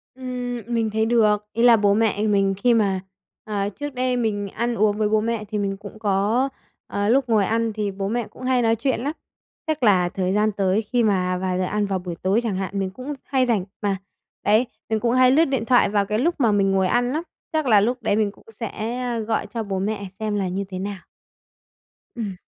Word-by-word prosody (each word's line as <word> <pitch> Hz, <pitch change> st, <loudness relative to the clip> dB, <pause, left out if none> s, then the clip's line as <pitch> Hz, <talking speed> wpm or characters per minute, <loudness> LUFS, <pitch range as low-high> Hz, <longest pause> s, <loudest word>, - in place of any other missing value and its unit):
Ừm, 250 Hz, -2 st, -4 dB
mình 230 Hz, -2 st, 0 dB
thấy 220 Hz, +1 st, 0 dB
được. 210 Hz, -3 st, +3 dB
Ý 230 Hz, -, 0 dB
là 240 Hz, -2 st, +7 dB
bố 205 Hz, -1 st, +3 dB
mẹ 215 Hz, -1 st, +1 dB
mình 195 Hz, -2 st, +2 dB
khi 240 Hz, +4 st, +3 dB
mà 200 Hz, -4 st, +2 dB, 0.4 s
ờ, 205 Hz, -1 st, -2 dB
trước 290 Hz, +6 st, -6 dB
đây 250 Hz, 0 st, 0 dB
mình 205 Hz, -4 st, -1 dB
ăn 235 Hz, +4 st, -2 dB
uống 210 Hz, -1 st, +2 dB
với 210 Hz, -1 st, +1 dB
bố 215 Hz, 0 st, +3 dB
mẹ 225 Hz, -1 st, -2 dB
thì 215 Hz, -, -2 dB
mình 195 Hz, -1 st, -1 dB
cũng 205 Hz, +2 st, -11 dB
có 215 Hz, +6 st, +1 dB, 0.4 s
ờ, 205 Hz, +1 st, -1 dB
lúc 260 Hz, 0 st, +3 dB
ngồi 210 Hz, -3 st, +3 dB
ăn 225 Hz, 0 st, 0 dB
thì 210 Hz, -2 st, -2 dB
bố 195 Hz, 0 st, -3 dB
mẹ 235 Hz, +1 st, -1 dB
cũng 255 Hz, -, -13 dB
hay 255 Hz, -1 st, +2 dB
nói 225 Hz, -1 st, +3 dB
chuyện 260 Hz, +3 st, -1 dB
lắm. 285 Hz, +5 st, -2 dB, 0.5 s
Chắc 310 Hz, -5 st, -1 dB
là 180 Hz, -5 st, +4 dB
thời 185 Hz, 0 st, -1 dB
gian 215 Hz, +1 st, +2 dB
tới 195 Hz, +1 st, +1 dB
khi 240 Hz, +3 st, 0 dB
mà 185 Hz, -4 st, +1 dB
vào 185 Hz, 0 st, -1 dB
giờ 185 Hz, -, 0 dB
ăn 205 Hz, +3 st, 0 dB
vào 195 Hz, -2 st, -1 dB
buổi 175 Hz, -1 st, -6 dB
tối 195 Hz, +4 st, +2 dB
chẳng 210 Hz, -5 st, -1 dB
hạn, 195 Hz, +1 st, -3 dB
mình 190 Hz, -, -1 dB
cũng 255 Hz, +9 st, -6 dB
hay 260 Hz, -2 st, +1 dB
rảnh 215 Hz, -7 st, +1 dB, 0.2 s
mà, 200 Hz, -2 st, 0 dB, 0.5 s
đấy, 220 Hz, +4 st, +4 dB, 0.2 s
mình 220 Hz, -1 st, +1 dB
cũng 235 Hz, +1 st, +1 dB
hay 255 Hz, 0 st, +5 dB
lướt 320 Hz, +4 st, +5 dB
điện 265 Hz, -5 st, -1 dB
thoại 245 Hz, +1 st, +4 dB
vào 200 Hz, -1 st, +1 dB
cái 215 Hz, +2 st, -1 dB
lúc 340 Hz, +6 st, +1 dB
mà 235 Hz, -5 st, +4 dB
mình 195 Hz, -1 st, +2 dB
ngồi 190 Hz, -1 st, +2 dB
ăn 245 Hz, +4 st, +1 dB
lắm, 315 Hz, +3 st, -1 dB, 0.3 s
chắc 310 Hz, -1 st, +1 dB
là 215 Hz, -5 st, +6 dB
lúc 245 Hz, +4 st, +1 dB
đấy 215 Hz, -2 st, +1 dB
mình 210 Hz, -2 st, +1 dB
cũng -, -, -22 dB
sẽ, 230 Hz, +2 st, -4 dB
ờ, 240 Hz, -2 st, -2 dB
gọi 220 Hz, -1 st, -1 dB
cho 230 Hz, +1 st, -4 dB
bố 195 Hz, -2 st, -3 dB
mẹ 200 Hz, 0 st, -2 dB
xem 215 Hz, -1 st, -1 dB
là 195 Hz, -2 st, 0 dB
như 190 Hz, +2 st, -2 dB
thế 185 Hz, -1 st, -5 dB
nào. 200 Hz, 0 st, -4 dB, 1.2 s
Ừm. 210 Hz, -6 st, -4 dB
215 Hz, 235 wpm, -23 LUFS, 200-240 Hz, 1.2 s, là